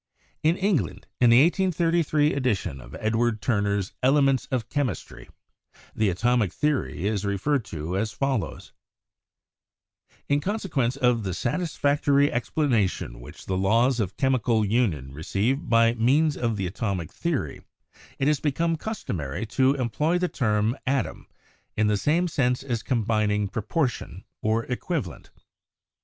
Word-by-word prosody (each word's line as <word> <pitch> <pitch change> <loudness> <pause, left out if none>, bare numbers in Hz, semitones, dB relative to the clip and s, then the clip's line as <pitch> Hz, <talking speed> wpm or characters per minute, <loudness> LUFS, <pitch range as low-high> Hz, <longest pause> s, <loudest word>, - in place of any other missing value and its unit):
In 160 +3 +2
England 180 - 0
in 120 - +5
the 120 +4 +7
1833 165 -4 +2
edition 110 - -1
of - - -11
Edward 110 +1 +1
Turner's 100 -4 0
"Elements 135 0 +3
of 120 -4 -2
Chemistry" 130 - -3 0.7
the 110 -2 +2
atomic 115 +1 +1
theory 145 - -1
is 105 -1 0
referred 105 +7 0
to 80 +3 -5
as 110 +3 -1
follows: 130 +2 -3 1.5
"In 145 0 +2
consequence 155 - -1
of 125 -4 +2
the 95 -4 -3
satisfactory 145 - +1
explanation 115 - 0
which - - -12
the 95 - -2
laws 115 +7 +2
of 100 -4 -2
chemical 125 -5 +2
union 95 - 0
receive 100 - -1
by 115 0 +4
means 140 +6 +2
of 115 -3 -1
the 95 - -2
atomic 95 -3 -3
theory 145 - -2 0.6
it 135 - 0
has 150 -2 +2
become 165 +3 0
customary 95 - -4
to 130 +4 +2
employ 145 +7 0
the 180 0 0
term 110 -5 0
atom 135 -3 -1 0.5
in 110 - +3
the 105 0 +2
same 160 - +1
sense 125 -5 0
as 120 -5 -2
combining 105 -4 0
proportion 110 - -2 0.2
or 110 +1 +1
equivalent." 125 - -4
120 Hz, 130 wpm, -25 LUFS, 105-145 Hz, 1.5 s, the